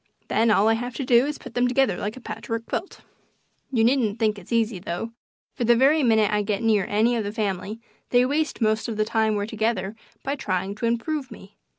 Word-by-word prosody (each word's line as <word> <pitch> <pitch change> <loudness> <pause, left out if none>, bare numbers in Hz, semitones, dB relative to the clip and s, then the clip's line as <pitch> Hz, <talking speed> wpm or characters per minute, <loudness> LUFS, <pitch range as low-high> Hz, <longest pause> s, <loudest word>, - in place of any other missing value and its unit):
Then 225 +1 +3
all 210 0 +4
I 225 - +5
have 245 +2 -4
to 270 - -3
do 245 +2 +4
is 300 - -3
to - - -18
put - - -9
them 245 +1 +2
together 255 -5 +2
like 210 +4 -4
a - - -10
patch - - -8
work 230 0 -2
quilt. 375 - -5 0.7
You 230 -4 +2
needn't 235 -3 +2
think 215 -3 +1
it's 185 - -16
easy, 225 -4 +1
though, 175 +6 -4 0.4
for - - -3
the 235 +1 +5
very 280 +6 +4
minute 220 -5 +3
I 210 0 +2
get 205 +1 -2
near 215 -4 +2
any 225 +4 +2
of 225 - -1
the 205 - -3
family 210 0 -3 0.3
they 245 0 +4
waste 300 +1 -1
most 220 0 +1
of 225 -2 -4
the 215 - +2
time 220 -1 +1
we're 205 0 -1
together 215 -2 -2 0.3
by 275 - -1
trying 190 -6 -2
to 230 - -1
improve 260 +4 -2
me. 200 -4 -13
225 Hz, 235 wpm, -24 LUFS, 210-245 Hz, 0.7 s, I